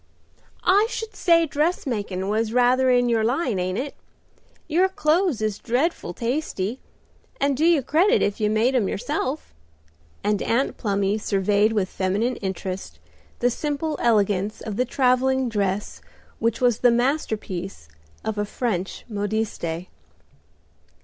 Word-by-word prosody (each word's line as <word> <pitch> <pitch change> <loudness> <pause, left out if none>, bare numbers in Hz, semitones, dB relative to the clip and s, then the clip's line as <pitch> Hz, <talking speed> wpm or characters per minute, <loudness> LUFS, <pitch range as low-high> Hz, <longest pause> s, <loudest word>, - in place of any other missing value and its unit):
"I 405 +4 +4
should 450 -3 -5
say 335 -3 +4
dressmakin' 250 - -1
was 220 +2 0
rather 250 +1 +4
in 245 -1 +4
your 230 -2 +2
line, 245 - 0
ain't 185 +1 -1
it? 275 +2 -3 0.7
Your 350 +4 +3
clothes 315 - +1
is 210 -1 -1
dreadful 255 - -1
tasty, 240 -3 -2 0.6
and 280 0 +2
do 295 - -1
you 330 -4 +4
credit 370 - +3
if 205 - -1
you 210 - +2
made 220 +5 +2
'em 230 -7 +2
yourself." 290 +4 -3 0.7
and 210 -1 +1
Aunt 245 +4 0
Plumy 200 -1 0
surveyed 205 +1 +2
with 200 -4 +1
feminine 205 +7 -1
interest 190 -1 -5 0.4
the 245 +1 +3
simple 300 +4 -2
elegance 205 -3 +2
of 215 -3 -5
the 250 +4 +1
travelling 260 0 +2
dress 200 -2 -2 0.4
which 230 +1 0
was 245 -3 +3
the 245 - +5
masterpiece 220 - -1 0.4
of 220 -1 -2
a - - +1
French 200 -4 -3
modiste. 205 -6 -2
235 Hz, 135 wpm, -24 LUFS, 205-275 Hz, 0.7 s, the